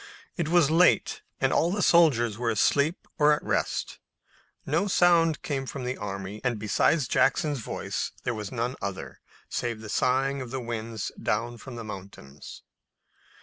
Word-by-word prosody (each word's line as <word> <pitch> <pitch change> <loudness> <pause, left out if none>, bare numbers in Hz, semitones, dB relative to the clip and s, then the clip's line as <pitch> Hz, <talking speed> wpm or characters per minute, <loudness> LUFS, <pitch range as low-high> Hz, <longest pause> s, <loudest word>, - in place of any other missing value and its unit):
It 170 -4 -2
was 170 -4 +4
late, 175 +3 +3 0.2
and - - +2
all 170 - +3
the 200 +2 -1
soldiers 130 -10 +4
were 120 +1 -1
asleep 140 - +1
or 150 0 +6
at 150 - -2
rest. - - -2 0.7
No 165 +8 +1
sound 170 -4 +3
came 135 -3 -3
from 135 -1 -5
the 125 +1 -2
army, 100 0 -6
and 125 -3 0
besides 120 +7 +1
Jackson's 145 +2 +2
voice 115 - -4
there 125 - -1
was 105 -3 -6
none 125 +1 -2
other, 100 -2 -5 0.3
save 120 -2 -3
the 110 -1 -9
sighing 135 +4 +1
of 125 - -6
the 130 +2 -3
winds 115 -3 -4
down 120 +2 -1
from 130 0 -9
the 115 - -6
mountains. 95 -9 -10
125 Hz, 160 wpm, -27 LUFS, 110-150 Hz, 0.7 s, or